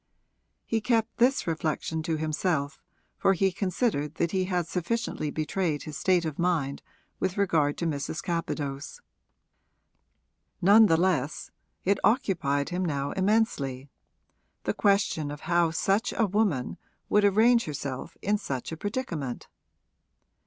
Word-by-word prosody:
He 225 -1 0
kept 225 -1 0
this 255 +3 +3
reflection 160 0 -2
to 160 0 -1
himself, 155 -1 -1 0.4
for 195 - +4
he 190 +1 +2
considered 180 - -1
that 170 -1 0
he 185 -1 +1
had 180 -2 0
sufficiently 180 -2 -2
betrayed 155 +1 -1
his 155 - -7
state 180 +1 +2
of 155 -3 -4
mind 160 -6 0 0.4
with 190 +1 -1
regard 160 -7 +2
to 170 - -2
Mrs. 155 0 -3
Capadose. 145 -5 -3 1.6
None 210 +4 +7
the 165 -3 +4
less 160 -5 0 0.3
it 195 +1 +2
occupied 165 - +1
him 180 +1 -2
now 140 -4 -1
immensely, 170 - 0 0.7
the - - 0
question 195 -7 +1
of 145 0 -7
how 170 -1 +2
such 195 +7 0
a 225 - +4
woman 195 - 0 0.3
would 210 - +3
arrange 225 +4 +4
herself 140 -3 -5
in 205 +1 +1
such 135 - -4
a 160 - -5
predicament. 170 - -4
170 Hz, 130 wpm, -27 LUFS, 150-200 Hz, 1.6 s, None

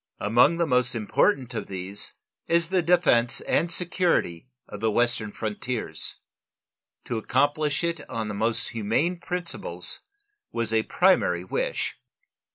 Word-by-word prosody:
Among 120 +10 +4
the 170 - +2
most 125 -4 +2
important 125 - +1
of 115 - -4
these 95 +1 -5 0.3
is 170 0 +2
the 185 -1 +2
defense 165 -9 +3
and 170 +1 +1
security 170 - +1 0.2
of - - -8
the 110 - +1
western 120 -1 +1
frontiers. 110 -5 -3 0.9
To 115 - -2
accomplish 145 +5 +1
it 170 -3 -3
on 110 -1 -3
the 105 - -4
most 110 +3 0
humane 115 - 0
principles 180 0 -3 0.5
was 115 -1 -2
a 110 - +4
primary 110 - +2
wish. 90 - -2
120 Hz, 130 wpm, -26 LUFS, 110-170 Hz, 0.9 s, Among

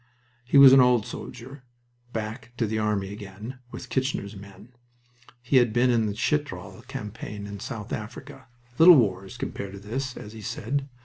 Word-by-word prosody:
He 125 +3 +2
was 135 -1 +10
an 135 - +8
old 125 -3 +4
soldier, 130 +4 -9 0.5
"back 110 +2 -5
to 115 - +1
the 110 +1 -2
army 105 -2 -1
again," 105 +5 -9
with - - -8
Kitchener's 130 -6 -2
men. 100 +2 -13 0.7
He 130 +2 +3
had 120 -3 +4
been 125 +3 +3
in 115 -2 +2
the 100 - -3
Chitral 110 -8 -2
campaign 105 -1 -7
and 100 -1 -8
South 110 -6 -6
Africa 110 +2 -8 0.3
"Little 170 +2 +10
wars 100 -1 0
compared 100 -4 -5
to 100 - -8
this," 125 +6 -4
as 105 - -9
he 110 - -9
said. 125 +5 -3
110 Hz, 170 wpm, -26 LUFS, 100-125 Hz, 0.7 s, was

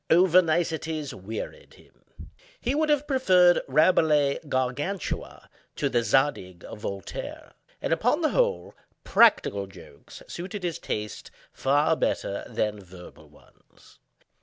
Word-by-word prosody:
Over 180 +1 +6
niceties 160 -3 -2
wearied 105 +4 -8
him. - - -18 0.3
He 250 - -1
would 305 +1 +1
have 295 -1 +2
preferred 185 -11 +4
Rabelais' 150 -1 +3
"Gargantua" 135 +10 -3 0.3
to 140 - -1
the 120 -3 +1
"Zadig" 115 -9 0
of - - -9
Voltaire: 100 -2 -7 0.3
and, - - +1
upon - - +1
the - - +2
whole, 85 - 0 0.3
practical 100 -1 +3
jokes 80 -7 -14
suited 185 +3 -7
his 170 -2 -3
taste 105 0 -5 0.2
far 145 +4 +2
better 100 -9 -2
than 105 -1 -2
verbal 90 -1 -14
ones. - - -23
145 Hz, 120 wpm, -26 LUFS, 105-175 Hz, 0.3 s, Over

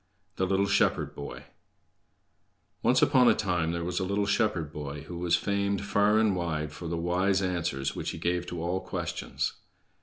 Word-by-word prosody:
The 95 - +1
Little 95 +1 +2
Shepherd - - +2
Boy 70 - -7 1.4
Once 130 +1 +4
upon 125 -2 +5
a - - +5
time 90 -5 0
there 85 0 -2
was 90 +2 -1
a - - -1
little 100 +2 0
shepherd 90 -8 0
boy 75 -1 -5
who 85 +3 -7
was 85 -1 +2
famed 100 0 0
far 105 +1 +3
and 110 -3 +3
wide 80 -4 -2
for 85 - -7
the 85 +1 -2
wise 95 +3 +1
answers 80 -7 -1
which - - -3
he - - -5
gave 90 0 -1
to 85 -2 -4
all 90 +2 0
questions. - - -3
90 Hz, 180 wpm, -28 LUFS, 85-100 Hz, 1.4 s, upon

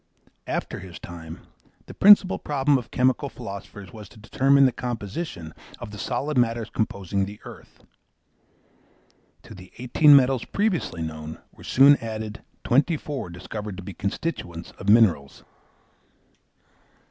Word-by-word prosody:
After - - -3
his 90 -2 -10
time, 80 -2 -10 0.4
the - - -11
principal 200 -2 +6
problem 145 0 +1
of 120 -1 -11
chemical 130 +2 +1
philosophers 100 -5 -9
was 105 -3 -11
to - - -18
determine 135 +5 +3
the 130 - +3
composition 110 - -6 0.2
of - - -9
the 105 - -9
solid 135 +2 -1
matters 115 -2 0
composing 100 -2 -2
the 105 +1 -10
earth. - - -13 1.6
To - - -12
the 95 -1 -13
eighteen 140 +4 +5
metals 130 -2 +3
previously 190 - -2
known 80 0 -7
were - - -17
soon 140 +2 +6
added 110 -2 -6 0.2
twenty 145 +6 +2
four 140 -10 -6
discovered 95 +3 -7
to 100 - -8
be 95 - -8
constituents 90 - -5
of 100 - -3
minerals. 95 -11 +3
110 Hz, 135 wpm, -24 LUFS, 95-135 Hz, 1.6 s, principal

